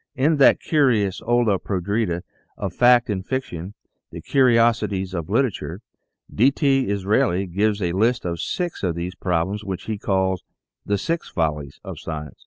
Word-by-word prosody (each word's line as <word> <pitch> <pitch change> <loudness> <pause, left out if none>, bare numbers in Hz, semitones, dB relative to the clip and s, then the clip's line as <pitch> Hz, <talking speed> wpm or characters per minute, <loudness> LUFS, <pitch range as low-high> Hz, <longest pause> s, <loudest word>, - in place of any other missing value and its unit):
In 145 +4 +2
that 140 - +6
curious 120 - +1
olla 115 -4 +2
podrida 95 -1 -2 0.3
of 95 -3 -4
fact 120 +3 +5
and 100 -4 -2
fiction, 100 -7 -4 0.3
"The - - -8
Curiosities 115 -7 +2
of 85 -2 -4
Literature," 105 -6 -1 0.5
DTsraeli 115 - +2
gives 105 +1 +1
a 85 - 0
list 110 +5 +1
of 85 -2 -3
six 175 -2 -3
of 90 -4 -1
these 85 +2 -4
prob 90 -2 -1
lems, 105 +1 -5
which 95 -3 -5
he 110 -2 -4
calls 95 -3 0 0.4
"The 100 - +1
Six 165 - -3
Follies 75 -4 -2
of - - -7
Science." 75 -2 -7
100 Hz, 150 wpm, -22 LUFS, 90-120 Hz, 0.5 s, that